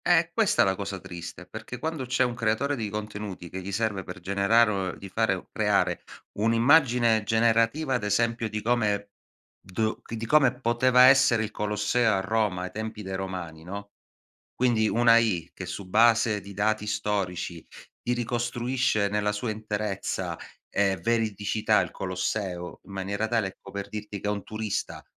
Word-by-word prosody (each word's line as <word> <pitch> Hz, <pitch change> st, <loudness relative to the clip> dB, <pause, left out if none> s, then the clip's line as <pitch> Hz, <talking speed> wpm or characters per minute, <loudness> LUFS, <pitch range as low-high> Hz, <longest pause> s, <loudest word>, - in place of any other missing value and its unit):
Eh, -, -, +1 dB
è -, -, +1 dB
questa -, -, +3 dB
la 95 Hz, 0 st, +1 dB
cosa 100 Hz, -1 st, -5 dB
triste, 85 Hz, 0 st, -8 dB
perché 110 Hz, +6 st, -8 dB
quando 155 Hz, 0 st, -3 dB
c'è 130 Hz, +1 st, +2 dB
un 125 Hz, -1 st, 0 dB
creatore 115 Hz, +5 st, 0 dB
di 110 Hz, -5 st, -3 dB
contenuti 105 Hz, -3 st, -6 dB
che 95 Hz, +2 st, -6 dB
gli 95 Hz, +2 st, -6 dB
serve 105 Hz, -1 st, -1 dB
per 90 Hz, -, -8 dB
generare 100 Hz, +5 st, +3 dB
o 95 Hz, -2 st, -2 dB
di 100 Hz, -, -10 dB
fare 95 Hz, -2 st, 0 dB
creare -, -, +1 dB, 0.4 s
un'immagine 115 Hz, 0 st, +4 dB
generativa, 115 Hz, +6 st, +2 dB
ad 120 Hz, -, -2 dB
esempio, 115 Hz, +2 st, +1 dB
di 110 Hz, 0 st, -3 dB
come 105 Hz, -4 st, +1 dB, 0.5 s
do 110 Hz, +4 st, -2 dB
di 115 Hz, -, -5 dB
di 110 Hz, -, -4 dB
come 130 Hz, -1 st, +4 dB
poteva 125 Hz, +1 st, +4 dB
essere 130 Hz, -4 st, +6 dB
il 110 Hz, -, -4 dB
Colosseo 105 Hz, +2 st, +1 dB
a 95 Hz, -, +1 dB
Roma 100 Hz, -3 st, 0 dB
ai 95 Hz, -, -5 dB
tempi 110 Hz, 0 st, -5 dB
dei 95 Hz, 0 st, -4 dB
Romani, 90 Hz, -4 st, -5 dB
no, 100 Hz, +3 st, -7 dB, 0.6 s
quindi 120 Hz, -3 st, +2 dB
una 120 Hz, +1 st, +4 dB
AI 100 Hz, -8 st, +2 dB
che, 95 Hz, -, -7 dB
su 95 Hz, +1 st, -6 dB
base 110 Hz, 0 st, +4 dB
di 100 Hz, +1 st, -11 dB
dati 105 Hz, +1 st, 0 dB
storici, 95 Hz, -5 st, -2 dB, 0.3 s
ti 120 Hz, -, -1 dB
ricostruisce 120 Hz, -2 st, 0 dB
nella 105 Hz, 0 st, 0 dB
sua 105 Hz, +2 st, -3 dB
interezza 105 Hz, -2 st, -3 dB, 0.3 s
e 100 Hz, -1 st, +1 dB
veridicità 110 Hz, +1 st, +1 dB
il -, -, -2 dB
Colosseo 95 Hz, -1 st, -3 dB
in 100 Hz, -, -13 dB
maniera 100 Hz, +2 st, -2 dB
tale, 110 Hz, -3 st, 0 dB
ecco, 95 Hz, -, -13 dB
per 100 Hz, 0 st, -5 dB
dirti 105 Hz, -1 st, -6 dB
che 105 Hz, -, -3 dB
un 105 Hz, -2 st, -2 dB
turista 110 Hz, -1 st, -4 dB
105 Hz, 165 wpm, -27 LUFS, 100-115 Hz, 0.6 s, essere